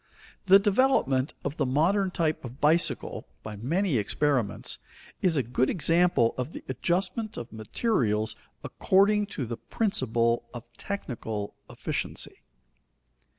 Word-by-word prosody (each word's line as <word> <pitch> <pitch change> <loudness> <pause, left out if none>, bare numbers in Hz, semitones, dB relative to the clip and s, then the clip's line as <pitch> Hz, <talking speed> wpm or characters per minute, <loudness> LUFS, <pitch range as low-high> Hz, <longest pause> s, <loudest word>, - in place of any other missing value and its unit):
The 195 +1 +8
development 200 - +2
of 140 +2 -3
the - - +1
modern 180 +9 +2
type 160 -3 -1
of 125 +2 -9
bicycle, 160 +3 +1 0.2
by 105 -1 -6
many 155 - 0
experiments, 125 0 0 0.4
is 170 -4 +2
a 135 - +2
good 125 +3 0
example 165 -6 +3
of 130 +6 -3
the - - -8
adjustment 185 - -1
of 120 -1 -7
materials 110 - 0 0.3
according 205 +2 +3
to 145 -10 -4
the 115 0 -5
principle 120 - 0
of 120 - -6
technical 115 - -4 0.2
efficiency. - - -4
145 Hz, 120 wpm, -27 LUFS, 120-195 Hz, 0.4 s, The